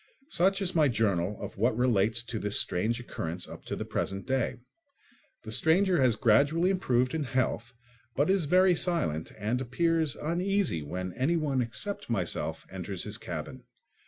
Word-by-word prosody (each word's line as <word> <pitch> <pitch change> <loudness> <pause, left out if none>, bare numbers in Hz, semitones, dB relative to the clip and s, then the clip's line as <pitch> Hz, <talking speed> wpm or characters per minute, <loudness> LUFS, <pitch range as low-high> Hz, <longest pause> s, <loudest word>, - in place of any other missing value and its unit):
Such 195 - +2
is 185 - +2
my 155 -3 +4
journal 100 -5 0
of - - -7
what 115 +1 +2
relates 115 -2 +2
to 120 -2 -5
this 105 0 +1
strange 110 +7 0
occurrence 90 -7 -5
up - - -11
to - - -3
the - - -4
present 95 0 -3
day. 130 0 0 0.9
The - - -7
stranger 180 0 +3
has 125 -4 +4
gradually 140 - +3
improved 125 -9 +1
in 160 - -1
health 125 -2 -1 0.4
but 145 +3 +2
is 190 -4 +2
very 185 +4 +5
silent 160 - -1
and 110 +4 -1
appears 160 +3 +1
uneasy 180 - 0
when 90 +5 -5
anyone 140 -1 +1
except 120 - -3
myself 95 -7 -2
enters - - -4
his - - -5
cabin. - - -6
130 Hz, 160 wpm, -29 LUFS, 110-170 Hz, 0.9 s, very